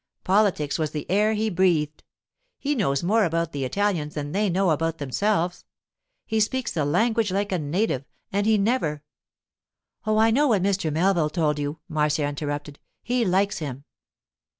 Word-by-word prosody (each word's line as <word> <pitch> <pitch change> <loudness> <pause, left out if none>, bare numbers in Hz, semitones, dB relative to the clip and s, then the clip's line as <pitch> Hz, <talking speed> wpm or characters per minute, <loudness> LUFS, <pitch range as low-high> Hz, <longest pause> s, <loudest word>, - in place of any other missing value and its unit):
Politics 185 -7 +2
was 155 -1 0
in - - 0
the 150 - -8
air 210 +3 +3
he 215 +1 0
breathed. 165 -5 +1 0.5
He 290 +1 -1
knows 155 - 0
more 215 +5 +3
about 165 -2 0
the 140 -1 -3
Italians 160 +1 -1
than 145 -1 -4
they 205 +3 +1
know 185 0 +2
about 165 +1 0
themselves. 175 +5 -1 0.6
He 220 - 0
speaks 255 +4 0
the 155 -4 -1
language 220 +6 +1
like 200 +1 -1
a 185 - 0
native, 150 - -1 0.3
and 200 +2 0
he 220 -1 +4
never——' 195 - 0 1.0
'Oh, 215 0 +2
I 225 +1 +5
know 290 +6 +3
what 210 -8 +2
Mr. 195 -5 0
Melville 170 0 +2
told 150 -2 0
you,' 145 +2 -4
Marcia 150 -1 +1
interrupted. 145 0 -4 0.2
'He 245 0 +1
likes 195 0 +1
him. 140 -3 -6
175 Hz, 170 wpm, -24 LUFS, 150-210 Hz, 1.0 s, I